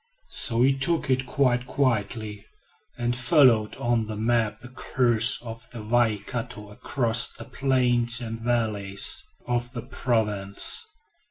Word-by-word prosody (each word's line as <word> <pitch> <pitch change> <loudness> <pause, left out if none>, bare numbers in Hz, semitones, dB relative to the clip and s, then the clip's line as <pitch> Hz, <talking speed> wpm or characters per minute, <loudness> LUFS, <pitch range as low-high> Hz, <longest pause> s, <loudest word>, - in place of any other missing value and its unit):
So 115 +1 +1
he 135 +1 +3
took 140 +1 -1
it 130 0 0
quite 125 -2 0
quietly 110 -5 -2 0.5
and 120 0 -1
followed 125 -4 +3
on 120 -2 -1
the 110 - -5
map 110 0 -1
the 125 - -11
course 125 -1 +1
of 115 -1 -10
the 115 -3 -9
Waikato 115 -1 -2
across 120 +2 +2
the - - -10
plains 120 -3 +1
and 115 -2 -6
valleys 110 -5 0 0.2
of 120 0 -3
the 120 - -6
province. 105 - +1
120 Hz, 125 wpm, -25 LUFS, 110-125 Hz, 0.5 s, he